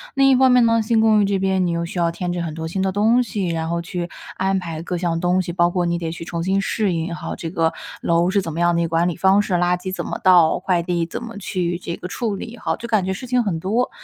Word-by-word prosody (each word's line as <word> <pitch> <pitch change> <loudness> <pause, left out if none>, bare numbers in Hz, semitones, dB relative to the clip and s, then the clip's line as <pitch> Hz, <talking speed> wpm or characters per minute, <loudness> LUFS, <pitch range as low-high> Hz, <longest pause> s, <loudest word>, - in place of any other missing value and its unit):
另 270 0 +5
一 265 - +6
方 260 0 +5
面 250 -2 +5
呢， 230 0 +3
新 220 +1 +1
公 220 -1 +4
寓 - - +3
这 195 0 0
边 190 -1 +1
你 170 - 0
又 170 0 -1
需 175 +1 -5
要 170 -1 +2
添 175 +1 -3
置 175 - -2
很 160 -2 -4
多 160 0 -4
新 190 +4 -3
的 190 - +1
东 220 +5 +3
西， 200 -5 -2
然 165 -1 -2
后 170 0 -1
去 175 0 -4 0.3
安 190 +1 +1
排 165 -3 -6
各 175 +1 -3
项 170 -1 -1
东 180 +1 +2
西。 175 -1 -5
包 175 0 +3
括 175 0 -1
你 170 0 0
得 165 -1 -4
去 165 - -7
重 170 -1 -4
新 190 +2 +1
适 200 -2 0
应 165 +1 -2
哈， - - -5
这 165 - -5
个 165 -2 +1 0.3
楼 170 +1 +2
是 200 0 +2
怎 165 - -5
么 165 - -5
样 175 0 +3
的 170 - +1
一 - - +1
个 165 - -4
管 165 +1 +2
理 175 - -1
方 190 +3 +4
式， 195 - -3
垃 175 0 +2
圾 185 +1 -6
怎 - - -4
么 - - -4
倒， 175 -4 +5
快 180 -2 +1
递 170 -1 -1
怎 170 - -6
么 230 -2 -8
去 180 -3 -2
这 170 -1 -5
个 180 - -7
处 220 +1 -2
理 230 +4 -8
哈， - - -2
就 235 - -7
感 215 -5 +1
觉 190 - -1
事 250 +7 -7
情 250 -1 +2
很 175 -6 -2
多。 220 +8 0
180 Hz, 330 characters per minute, -21 LUFS, 170-205 Hz, 0.3 s, 一